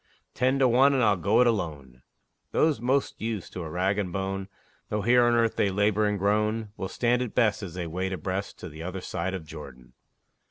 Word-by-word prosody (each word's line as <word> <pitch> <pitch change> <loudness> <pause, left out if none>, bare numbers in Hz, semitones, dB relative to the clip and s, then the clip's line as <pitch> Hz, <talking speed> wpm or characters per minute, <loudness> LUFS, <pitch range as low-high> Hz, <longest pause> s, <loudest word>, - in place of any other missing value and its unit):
Ten 130 +2 +1
to 135 -1 +4
one, 135 +4 +5
and 130 - +2
I'll 105 -2 +4
go 100 +7 +3
it - - +5
alone; 75 - -2 0.5
Those 155 -6 +2
most 130 +3 0
used 110 -4 -4
to 90 - -5
a 80 - -5
rag 95 +5 0
and 95 -3 -2
bone, 95 +1 -3 0.4
Though 105 -1 -1
here 120 +2 +5
on 120 0 +3
earth 115 -1 +1
they 100 - +2
labor 105 +2 +2
and 105 0 0
groan, 105 +2 0
Will 95 - -5
stand 120 +1 +1
it 125 -4 -4
best, 105 -4 +2
as 90 -4 -7
they 90 -2 -3
wade 90 +4 -3
abreast 95 +2 -4
To - - -6
the 80 -1 -10
other 90 +2 -5
side 95 +2 -3
of 90 -4 -7
Jordan. 70 -5 -11
100 Hz, 215 wpm, -27 LUFS, 90-115 Hz, 0.5 s, one